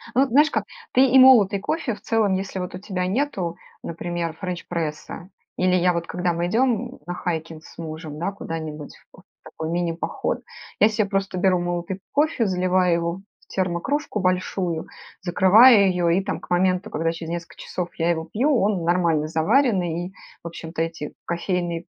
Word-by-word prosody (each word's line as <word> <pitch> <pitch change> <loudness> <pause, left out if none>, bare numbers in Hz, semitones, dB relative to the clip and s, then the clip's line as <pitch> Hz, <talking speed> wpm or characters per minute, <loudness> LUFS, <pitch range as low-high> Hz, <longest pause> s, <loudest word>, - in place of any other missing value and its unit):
Ну, 270 +2 +5
знаешь 290 +5 +4
как, - - -1 0.3
ты 265 +1 +5
и 265 +1 +5
молотый 230 -7 +7
кофе, 260 -1 -2
в - - -15
целом, 215 -4 +1
если 190 0 -3
вот 180 0 -5
у - - -5
тебя 185 -2 -3
нету, 190 - -1 0.3
например, 170 -1 -4
френч-пресса. 170 -1 -5 0.3
Или 185 0 +2
я 180 0 +3
вот, 170 0 -3
когда 180 -1 -1
мы 170 +1 -1
идём, 240 +3 +1
м, - - -15
на 175 - -4
хайкинг 160 -2 -4
с - - -16
мужем, 155 -2 -7
да, 185 +4 -2
куда-нибудь 160 -5 -6 0.2
вот - - -18
в - - -80
такой 160 0 -6
мини-поход, 170 -1 -2 0.4
я 210 - +7
се 215 -1 0
просто 195 -2 -2
беру 185 -1 +3
молотый 175 +2 -3
кофе, 290 -6 +2
заливаю 185 -1 +2
его 170 0 0 0.3
в - - -27
термокружку 195 - -2
большую, 180 -2 -1 0.4
закрываю 200 +4 +6
её- 180 -2 +1
и, 180 +3 +2
там, - - -3
к - - -15
моменту, 185 +3 +1
когда 165 +2 -1
через 165 0 -7
несколько 170 0 -6
часов 180 -1 -4
я 165 +1 +2
его 160 -1 -1
пью, 275 +7 +2
он 195 -3 +1
нормально 170 -3 +1
заваренный 175 - +1
и 190 - -10 0.3
в 170 - -5
общем-то 165 0 -7
эти 165 -3 -5
кофейные 170 -1 -2
180 Hz, 175 wpm, -23 LUFS, 170-200 Hz, 0.4 s, молотый